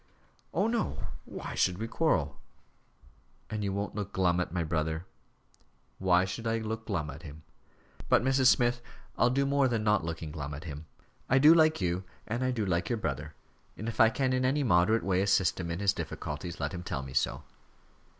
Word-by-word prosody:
"Oh, 185 Hz, +6 st, +1 dB
no 230 Hz, -1 st, -2 dB, 0.2 s
why -, -, -7 dB
should 90 Hz, -1 st, +1 dB
we 110 Hz, +3 st, -3 dB
quarrel?" 75 Hz, -, 0 dB, 1.1 s
"And 110 Hz, -1 st, -2 dB
you 100 Hz, -, -1 dB
won't 100 Hz, +1 st, -3 dB
look 105 Hz, -2 st, -4 dB
glum 90 Hz, -2 st, +2 dB
at 90 Hz, -, -2 dB
my 85 Hz, -1 st, -1 dB
brother?" 80 Hz, +1 st, -2 dB, 0.9 s
"Why 90 Hz, -1 st, +4 dB
should 115 Hz, +4 st, -5 dB
I 115 Hz, 0 st, +1 dB
look 110 Hz, 0 st, -4 dB
glum 80 Hz, -8 st, -2 dB
at 75 Hz, +4 st, -10 dB
him? 75 Hz, -2 st, -11 dB, 0.7 s
But, -, -, +4 dB
Mrs. 130 Hz, 0 st, +3 dB
Smith, 120 Hz, -1 st, +3 dB, 0.3 s
I'll 120 Hz, -, +3 dB
do 140 Hz, +2 st, +1 dB
more 140 Hz, -1 st, +3 dB
than 115 Hz, -3 st, -1 dB
not 105 Hz, -4 st, +2 dB
looking 80 Hz, -1 st, -5 dB
glum 75 Hz, -1 st, -5 dB
at 75 Hz, -, -8 dB
him. 75 Hz, -1 st, -8 dB, 0.4 s
I 130 Hz, -, +4 dB
do 150 Hz, +4 st, +8 dB
like 155 Hz, -6 st, +4 dB
you, 90 Hz, +1 st, 0 dB, 0.2 s
and 120 Hz, +3 st, -2 dB
I 130 Hz, -, +1 dB
do 115 Hz, -5 st, -1 dB
like 85 Hz, -2 st, 0 dB
your 120 Hz, -, 0 dB
brother, 70 Hz, -10 st, -4 dB, 0.4 s
and 110 Hz, -, -5 dB
if 115 Hz, -, -5 dB
I 110 Hz, -, +7 dB
can 130 Hz, +2 st, 0 dB
in 130 Hz, 0 st, +1 dB
any 140 Hz, +3 st, +2 dB
moderate 110 Hz, 0 st, +3 dB
way 95 Hz, -1 st, +1 dB
assist 95 Hz, -3 st, +2 dB
him 85 Hz, -2 st, -4 dB
in 85 Hz, -, -2 dB
his 100 Hz, 0 st, +2 dB
difficulties, 75 Hz, 0 st, -5 dB
let 70 Hz, -1 st, -2 dB
him 90 Hz, -, -5 dB
tell 70 Hz, -6 st, -4 dB
me 65 Hz, -1 st, -9 dB
so." 65 Hz, -, 0 dB
100 Hz, 200 wpm, -30 LUFS, 85-120 Hz, 1.1 s, do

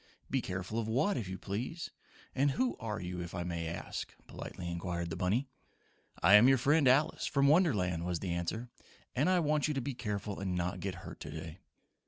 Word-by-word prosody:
"Be -, -, +2 dB
careful 95 Hz, +5 st, -3 dB
of 110 Hz, -, -2 dB
what, 135 Hz, -, +2 dB
if 115 Hz, -8 st, -3 dB
you 95 Hz, 0 st, -4 dB
please, 120 Hz, -, -4 dB, 0.4 s
and 140 Hz, +2 st, +3 dB
who 245 Hz, -, +1 dB
are 110 Hz, -1 st, -3 dB
you, 90 Hz, 0 st, -4 dB
if 85 Hz, +1 st, -6 dB
I 90 Hz, -, -2 dB
may 85 Hz, -1 st, -3 dB
ask?" 85 Hz, -, -5 dB
politely 90 Hz, -, -7 dB
inquired 85 Hz, 0 st, -3 dB
the -, -, -2 dB
bunny. 100 Hz, +10 st, +1 dB, 0.8 s
"I -, -, +7 dB
am 110 Hz, +5 st, +9 dB
your 135 Hz, -, +6 dB
friend 145 Hz, +3 st, +4 dB
Alice, 135 Hz, +4 st, +3 dB
from 140 Hz, -1 st, +3 dB
Wonderland," 105 Hz, -, +3 dB
was 90 Hz, 0 st, -1 dB
the 90 Hz, -3 st, -2 dB
answer, 110 Hz, +8 st, -3 dB, 0.4 s
"and 145 Hz, +8 st, +3 dB
I 185 Hz, -1 st, +4 dB
want 150 Hz, -1 st, +2 dB
you 150 Hz, -, -1 dB
to -, -, +1 dB
be 135 Hz, +3 st, -3 dB
careful 105 Hz, -4 st, -3 dB
and 95 Hz, -2 st, -2 dB
not 90 Hz, 0 st, -1 dB
get -, -, -3 dB
hurt -, -, -8 dB
today." 80 Hz, +2 st, -7 dB
105 Hz, 205 wpm, -33 LUFS, 90-135 Hz, 0.8 s, am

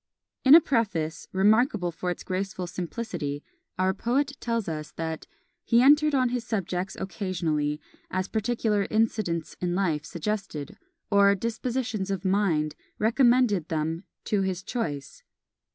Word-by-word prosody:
In 270 Hz, +3 st, +9 dB
a 335 Hz, -, +9 dB
Preface, 190 Hz, -, -1 dB
remarkable 205 Hz, -1 st, +3 dB
for 180 Hz, +2 st, -4 dB
its 175 Hz, -, -4 dB
graceful 185 Hz, 0 st, -3 dB
simplicity, 170 Hz, -5 st, -4 dB, 0.3 s
our 185 Hz, +1 st, +2 dB
poet 275 Hz, +7 st, 0 dB
tells 230 Hz, -3 st, -1 dB
us, 155 Hz, -2 st, -4 dB
that 160 Hz, -1 st, -4 dB, 0.4 s
"He 235 Hz, -, +4 dB
entered 295 Hz, +3 st, +5 dB
on 255 Hz, -2 st, +3 dB
his 245 Hz, -1 st, -2 dB
subjects 190 Hz, -4 st, -3 dB
occasionally, 165 Hz, -7 st, -1 dB, 0.3 s
as 185 Hz, 0 st, -1 dB
particular 220 Hz, -2 st, 0 dB
incidents 215 Hz, -7 st, 0 dB
in 175 Hz, -1 st, 0 dB
life 165 Hz, -6 st, 0 dB
suggested, 185 Hz, -3 st, -4 dB, 0.3 s
or 200 Hz, 0 st, +6 dB
dispositions 230 Hz, -1 st, -2 dB
of 195 Hz, -1 st, -3 dB
mind 180 Hz, -6 st, +1 dB, 0.2 s
recommended 235 Hz, -, +3 dB
them 160 Hz, +2 st, -2 dB, 0.2 s
to 205 Hz, -2 st, +1 dB
his 185 Hz, -1 st, -2 dB
choice." 150 Hz, -, -4 dB
195 Hz, 130 wpm, -27 LUFS, 170-230 Hz, 0.4 s, In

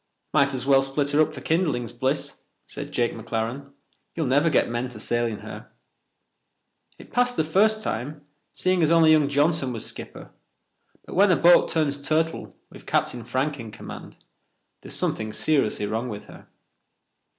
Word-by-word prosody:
"Might 140 Hz, 0 st, +4 dB
as 130 Hz, -, -3 dB
well 135 Hz, -1 st, +5 dB
split 140 Hz, +1 st, -1 dB
her 145 Hz, +2 st, +4 dB
up 155 Hz, 0 st, +2 dB
for 135 Hz, -4 st, -9 dB
kindlings, 150 Hz, -, 0 dB
Bliss," -, -, -2 dB, 0.2 s
said -, -, -8 dB
Jake 120 Hz, -1 st, 0 dB
McLaren. 115 Hz, +5 st, -4 dB, 0.4 s
"You'll 160 Hz, -, -1 dB
never 145 Hz, +5 st, +3 dB
get 150 Hz, -, +2 dB
men 120 Hz, +2 st, -3 dB
to 120 Hz, -3 st, -10 dB
sail 120 Hz, +2 st, 0 dB
in 110 Hz, -3 st, -5 dB
her. -, -, -9 dB, 1.3 s
It -, -, -15 dB
passed 245 Hz, +1 st, +2 dB
the -, -, +3 dB
first 215 Hz, +7 st, +2 dB
time, 145 Hz, -, -4 dB, 0.3 s
seeing 185 Hz, -1 st, 0 dB
as 155 Hz, -, +3 dB
only 165 Hz, -1 st, +6 dB
young 150 Hz, -3 st, +4 dB
Johnson 145 Hz, -1 st, +2 dB
was 115 Hz, -3 st, -4 dB
skipper, -, -, -9 dB, 0.7 s
but -, -, -9 dB
when 195 Hz, +1 st, +5 dB
a -, -, +5 dB
boat 175 Hz, +1 st, +5 dB
turns 145 Hz, -3 st, 0 dB
turtle 160 Hz, +3 st, -1 dB, 0.2 s
with -, -, -14 dB
Captain 120 Hz, -2 st, 0 dB
Frank 135 Hz, +4 st, -2 dB
in 115 Hz, -1 st, -7 dB
command, -, -, -10 dB, 0.6 s
there's -, -, -8 dB
something 110 Hz, -1 st, -2 dB
serious 140 Hz, -9 st, +1 dB
wrong 110 Hz, +4 st, -2 dB
with 105 Hz, -2 st, -7 dB
her." -, -, -14 dB
140 Hz, 170 wpm, -24 LUFS, 120-160 Hz, 1.3 s, only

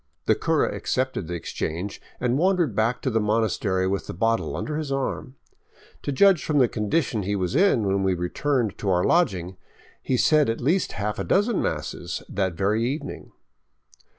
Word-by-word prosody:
The -, -, +4 dB
cura -, -, +1 dB
accepted 130 Hz, -9 st, -2 dB
the 85 Hz, -, -4 dB
exchange 85 Hz, +3 st, -4 dB, 0.2 s
and 125 Hz, +2 st, +1 dB
wandered 175 Hz, -, +2 dB
back 115 Hz, +3 st, 0 dB
to 130 Hz, -, 0 dB
the 115 Hz, -, +2 dB
monas 110 Hz, -1 st, +1 dB
tery 95 Hz, -2 st, 0 dB
with 100 Hz, +1 st, -2 dB
the -, -, -6 dB
bottle 115 Hz, +5 st, 0 dB
under 150 Hz, -1 st, -3 dB
his 155 Hz, -3 st, -4 dB
arm. 135 Hz, -1 st, -3 dB, 0.7 s
To -, -, -3 dB
judge 185 Hz, +5 st, +4 dB
from 150 Hz, -, 0 dB
the 130 Hz, -3 st, +5 dB
condition 110 Hz, +2 st, -1 dB
he 100 Hz, +2 st, -1 dB
was 95 Hz, +4 st, -2 dB
in 170 Hz, -, +3 dB
when 95 Hz, 0 st, +1 dB
we 95 Hz, -1 st, +1 dB
returned 115 Hz, +6 st, -1 dB
to 100 Hz, -, -2 dB
our 90 Hz, -1 st, +2 dB
lodging, 95 Hz, -, +1 dB, 0.4 s
he 130 Hz, -, 0 dB
said 150 Hz, 0 st, +4 dB
at 115 Hz, -, -1 dB
least 165 Hz, +9 st, +1 dB
a -, -, -9 dB
half 105 Hz, +1 st, -2 dB
dozen 205 Hz, +2 st, +2 dB
masses -, -, -3 dB
that 95 Hz, -2 st, -1 dB
very 105 Hz, +5 st, +1 dB
evening. 140 Hz, +4 st, -4 dB
115 Hz, 180 wpm, -24 LUFS, 95-145 Hz, 0.7 s, the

